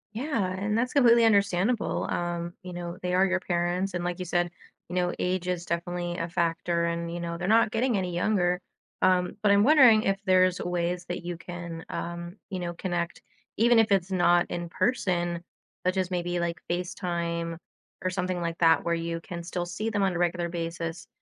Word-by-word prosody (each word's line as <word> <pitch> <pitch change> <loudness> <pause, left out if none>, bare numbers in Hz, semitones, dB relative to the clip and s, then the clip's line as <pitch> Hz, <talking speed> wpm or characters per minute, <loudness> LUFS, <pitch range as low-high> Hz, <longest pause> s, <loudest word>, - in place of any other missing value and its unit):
Yeah, 230 -7 -1
and 210 +2 0
that's 250 +2 0
completely 235 -4 +6
understandable, 200 +1 +2
um, 175 0 -2
you 180 - -7
know, 175 0 -6
they 180 0 -2
are 185 +1 +5
your 185 -1 0
parents, 175 +2 -1
and 175 -1 -2
like 175 0 -2
you 185 - -4
said, 175 0 0 0.4
you 180 - -6
know, 180 -1 +1
age 180 0 -1
is 175 -1 -2
definitely 175 +1 -2
a 165 - -3
factor 170 0 0
and, 170 0 -2
you 175 - -4
know, 170 0 -4
they're 180 +3 -2
not 225 -1 +5
getting 235 0 +1
any 180 -2 -2
younger. 180 -1 +1 0.4
Um, 185 0 +3
but 205 - +5
I'm 200 +1 +5
wondering 255 -7 +7
if 195 0 +1
there's 185 -1 +4
ways 175 0 -1
that 175 -1 -4
you 175 -1 -3
can, 170 -1 -7
um, 170 +2 -5
you 185 - -4
know, 175 -1 -3
connect 175 -1 -3 0.4
even 235 +2 +5
if 225 -2 +4
it's 190 -2 +2
not 175 -1 +4
in 175 -1 -4
person, 175 -6 0 0.4
such 185 +1 +1
as 185 -1 0
maybe, 175 -1 -1
like, 170 -2 -2
FaceTime 170 -2 -2 0.4
or 185 - 0
something 180 0 -2
like 170 -1 -3
that 165 -1 +4
where 170 0 +1
you 165 0 -3
can 170 0 -7
still 175 +1 -3
see 215 +6 -3
them 205 -2 -1
on 190 -2 +2
a - - -2
regular 175 0 0
basis, 165 0 -4
175 Hz, 200 wpm, -27 LUFS, 170-190 Hz, 0.4 s, wondering